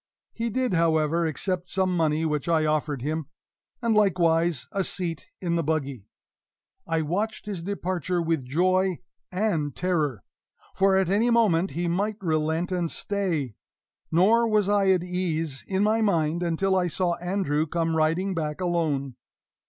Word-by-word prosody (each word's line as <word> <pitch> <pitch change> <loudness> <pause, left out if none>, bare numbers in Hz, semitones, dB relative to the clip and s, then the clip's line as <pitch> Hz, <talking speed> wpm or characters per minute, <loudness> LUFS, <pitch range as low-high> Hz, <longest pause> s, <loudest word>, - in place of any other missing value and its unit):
He 230 0 -2
did, 250 -1 0
however, 165 0 +2
accept 180 +3 -2
some 185 -1 +1
money 160 -1 +1
which 150 0 -1
I 160 -2 +3
offered 150 -4 -1
him, 155 +1 -2 0.6
and 230 -1 +2
likewise 170 -7 +2
a 195 - 0
seat 175 -4 -4
in 170 -2 -1
the - - +1
buggy. 140 -8 -2 0.8
I 165 -1 0
watched 205 +9 -2
his 200 -5 -4
departure 185 -1 -2
with 165 -4 0
joy 185 +6 +1 0.3
and 180 - -1
terror 155 - -1 0.5
for 195 0 +3
at 190 -2 +2
any 215 +5 +2
moment 200 -7 +3
he 175 0 0
might 200 +5 -1
relent 160 0 0
and 175 -2 0
stay; 170 - -2 0.6
nor 220 +8 +4
was 210 -3 +2
I 200 -1 +3
at 185 -2 +3
ease 165 -5 -2
in 190 0 +1
my 220 +2 +2
mind 170 -5 +1
until 180 +3 +1
I 180 -1 +2
saw 175 +1 0
Andrew 175 -4 -1
come 165 0 -1
riding 165 +5 +1
back 155 -2 -3
alone. 155 -8 -1
175 Hz, 150 wpm, -26 LUFS, 160-190 Hz, 0.8 s, nor